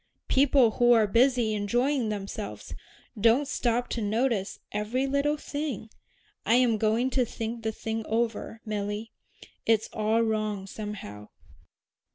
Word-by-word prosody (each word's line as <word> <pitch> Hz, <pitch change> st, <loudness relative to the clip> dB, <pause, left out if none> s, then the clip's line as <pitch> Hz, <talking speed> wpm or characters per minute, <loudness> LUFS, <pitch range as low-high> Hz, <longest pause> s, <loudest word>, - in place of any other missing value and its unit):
People 265 Hz, -3 st, +4 dB
who 240 Hz, 0 st, +6 dB
are 225 Hz, -2 st, +5 dB
busy 235 Hz, +1 st, +3 dB
enjoying 240 Hz, +4 st, 0 dB
themselves 195 Hz, -, -5 dB, 0.5 s
don't 235 Hz, +6 st, +4 dB
stop 245 Hz, -2 st, 0 dB
to 235 Hz, -, -3 dB
notice 215 Hz, -1 st, 0 dB
every 215 Hz, +6 st, -1 dB
little 280 Hz, +2 st, +1 dB
thing. 285 Hz, -8 st, -5 dB, 0.5 s
I 230 Hz, -, +3 dB
am 240 Hz, -3 st, +3 dB
going 225 Hz, +4 st, +1 dB
to 255 Hz, -, +2 dB
think 230 Hz, 0 st, -5 dB
the 220 Hz, 0 st, -1 dB
thing 225 Hz, +1 st, -4 dB
over, 225 Hz, 0 st, -2 dB
Milly. 210 Hz, +1 st, -3 dB, 0.6 s
It's 220 Hz, -1 st, +3 dB
all 220 Hz, +2 st, +2 dB
wrong 215 Hz, -3 st, -1 dB
somehow." 195 Hz, -, -7 dB
225 Hz, 130 wpm, -27 LUFS, 210-245 Hz, 0.6 s, who